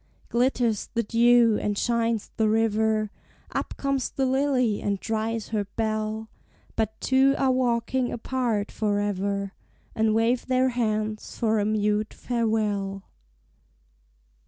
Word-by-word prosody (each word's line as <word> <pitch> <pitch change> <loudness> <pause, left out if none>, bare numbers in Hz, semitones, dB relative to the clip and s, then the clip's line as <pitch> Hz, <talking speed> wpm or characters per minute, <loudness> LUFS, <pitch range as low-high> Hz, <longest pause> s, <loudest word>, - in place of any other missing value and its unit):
Glitters 240 -3 +1
the 235 - +2
dew, 235 0 +4
and 205 -1 -1
shines 230 -2 0
the 220 -1 +2
river; 220 -1 +1 0.4
Up - - -3
comes 275 -2 -1
the 270 - -1
lily 260 -4 +1
and 200 -1 -1
dries 225 0 -2
her 210 -2 -1
bell; 220 0 -2 0.5
But 220 -1 -2
two 270 +1 +3
are 265 -1 +2
walking 250 0 0
apart 235 -4 -1
forever, 200 -1 -1 0.4
And 220 0 +2
wave 230 +2 +1
their 260 0 +3
hands 215 -3 -2
for 220 -2 +1
a 205 - +1
mute 210 0 0
farewell. 210 -5 -1
220 Hz, 120 wpm, -26 LUFS, 215-240 Hz, 0.5 s, dew